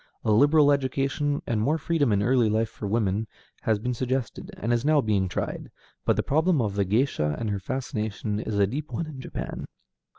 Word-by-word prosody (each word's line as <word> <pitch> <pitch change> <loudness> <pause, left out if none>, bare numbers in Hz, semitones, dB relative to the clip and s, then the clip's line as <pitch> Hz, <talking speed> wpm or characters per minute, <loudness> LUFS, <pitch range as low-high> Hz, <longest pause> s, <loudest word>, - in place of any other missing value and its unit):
A 110 - +3
liberal 145 +6 +5
education, 140 +1 0
and 110 -3 0
more 145 +8 +2
freedom 155 -5 +1
in 100 0 +2
early 120 -1 +3
life 110 +1 +1
for 105 - -6
women, 105 0 0 0.3
has 110 -1 +1
been 125 +4 -2
suggested, 130 +1 -3
and 115 +3 0
is 120 0 +1
now 150 +1 +4
being 100 -7 +1
tried, - - -4 0.4
but - - +3
the - - 0
problem 160 +2 +2
of 105 -5 0
the 100 -1 +1
géisha 100 - +1
and 110 -3 -2
her 100 - -1
fascination 110 -3 -3
is 110 -1 -3
a 100 - +5
deep 145 +9 -5
one 165 - -2
in 145 -4 -8
Japan. - - -5
120 Hz, 200 wpm, -26 LUFS, 105-140 Hz, 0.4 s, liberal